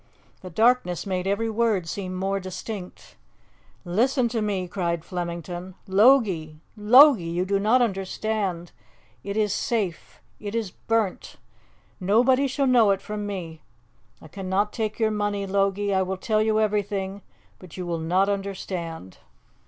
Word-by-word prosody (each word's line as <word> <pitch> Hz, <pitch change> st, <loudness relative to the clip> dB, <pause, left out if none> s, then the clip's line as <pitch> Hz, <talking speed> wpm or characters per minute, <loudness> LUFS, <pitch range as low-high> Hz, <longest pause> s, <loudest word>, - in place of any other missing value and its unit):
The 185 Hz, -, -8 dB
darkness 220 Hz, -2 st, +2 dB
made 185 Hz, -1 st, -2 dB
every 200 Hz, +3 st, 0 dB
word 220 Hz, -5 st, 0 dB
seem 185 Hz, +1 st, -4 dB
more 195 Hz, +1 st, -1 dB
distinct. 185 Hz, +1 st, -8 dB, 0.7 s
"Listen 240 Hz, +8 st, +2 dB
to 230 Hz, -1 st, -2 dB
me!" 195 Hz, -4 st, -1 dB
cried 170 Hz, -3 st, -2 dB
Flemington. 175 Hz, 0 st, -5 dB
"Logie! 190 Hz, -, +3 dB, 0.2 s
Logie! 235 Hz, -, +7 dB
you 175 Hz, +2 st, -1 dB
do 200 Hz, +1 st, +1 dB
not 230 Hz, +5 st, +4 dB
understand... 195 Hz, -3 st, -2 dB, 0.5 s
it 200 Hz, +1 st, -4 dB
is 210 Hz, -2 st, +1 dB
safe... 205 Hz, -6 st, -3 dB, 0.2 s
it 205 Hz, +1 st, -6 dB
is 220 Hz, -5 st, -2 dB
burnt! 225 Hz, -3 st, -2 dB, 0.6 s
Nobody 245 Hz, +8 st, +3 dB
shall 275 Hz, +1 st, 0 dB
know 245 Hz, -5 st, +5 dB
it 195 Hz, -1 st, +2 dB
from 210 Hz, 0 st, -5 dB
me.... 170 Hz, -6 st, -6 dB, 0.6 s
I -, -, -13 dB
cannot 195 Hz, +4 st, -2 dB
take 215 Hz, -2 st, -3 dB
your 220 Hz, -1 st, +1 dB
money, 205 Hz, -1 st, -1 dB
Logie... 200 Hz, +1 st, 0 dB
I 190 Hz, -, +2 dB
will 190 Hz, 0 st, -2 dB
tell 215 Hz, +3 st, 0 dB
you 215 Hz, 0 st, +2 dB
everything, 200 Hz, -2 st, -1 dB, 0.4 s
but 180 Hz, -2 st, -13 dB
you 180 Hz, -, -4 dB
will 170 Hz, -1 st, -2 dB
not 180 Hz, +5 st, +2 dB
understand. 185 Hz, -, -5 dB
200 Hz, 145 wpm, -25 LUFS, 185-220 Hz, 0.7 s, Logie